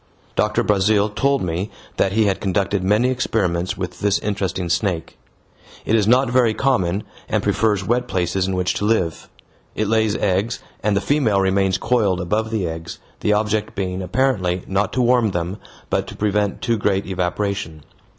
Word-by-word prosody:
Doctor 105 0 +1
Brazil 105 +1 +3
told 140 +6 +1
me 90 +4 -2 0.3
that 95 - +2
he 110 0 +3
had 100 -2 0
conducted 95 0 0
many 105 +6 +3
experiments 95 -8 -1
with 90 -1 -5
this 100 -1 +2
interesting 95 -3 -2
snake. 85 0 -1 0.7
It - - 0
is 105 -2 +2
not 125 +2 +4
very 120 -3 +3
common, 100 -8 +1 0.3
and - - 0
prefers 105 -3 +1
wet 125 +3 0
places 90 0 0
in 95 - -1
which 90 0 0
to 105 - -2
live. 95 -7 0 0.5
It 110 - 0
lays 110 -1 +2
eggs, 100 +4 0 0.2
and 105 -2 +1
the - - +1
female 115 -3 +2
remains 95 0 +2
coiled 105 -7 +1
above 105 +5 -1
the 110 -5 -1
eggs, 80 0 -6 0.2
the 105 - +2
object 105 0 0
being 95 -1 -2
apparently 95 -3 0
not 95 +1 0
to 125 - +1
warm 120 -2 +3
them, 85 +3 -2 0.3
but - - 0
to - - -8
prevent 105 -1 0
too 115 -2 +1
great 100 -1 +1
evaporation. 90 -3 -2
100 Hz, 170 wpm, -21 LUFS, 95-110 Hz, 0.7 s, not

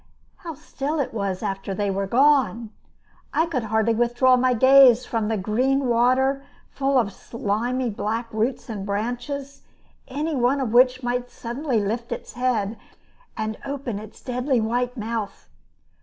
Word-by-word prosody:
How 330 -4 -8
still 300 0 -4
it 280 - -2
was 200 -2 -3
after 195 -1 -3
they 205 -1 -1
were 195 0 -2
gone! 240 -3 +3 0.6
I 320 - +3
could 270 -9 -3
hardly 220 +1 +1
withdraw 240 +2 +3
my 250 0 +2
gaze 260 0 +7
from 225 -2 -1
the 220 0 0
green 255 +8 +1
water 255 +3 +2 0.3
full 275 0 +1
of 210 -6 +1
slimy 235 +4 -2
black 225 +3 -3
roots 225 +4 -1
and 210 -4 -5
branches, 245 +7 -4 0.5
any 295 +4 -2
one 255 +2 +2
of 245 -5 -2
which 255 +1 +4
might 245 0 -2
suddenly 245 +1 -2
lift 225 +4 -3
its - - -6
head 230 -4 -1 0.6
and 220 0 -3
open 275 -7 -4
its 215 0 -13
deadly 250 0 0
white 245 +3 -1
mouth! 220 -1 -4
245 Hz, 150 wpm, -23 LUFS, 220-265 Hz, 0.6 s, gaze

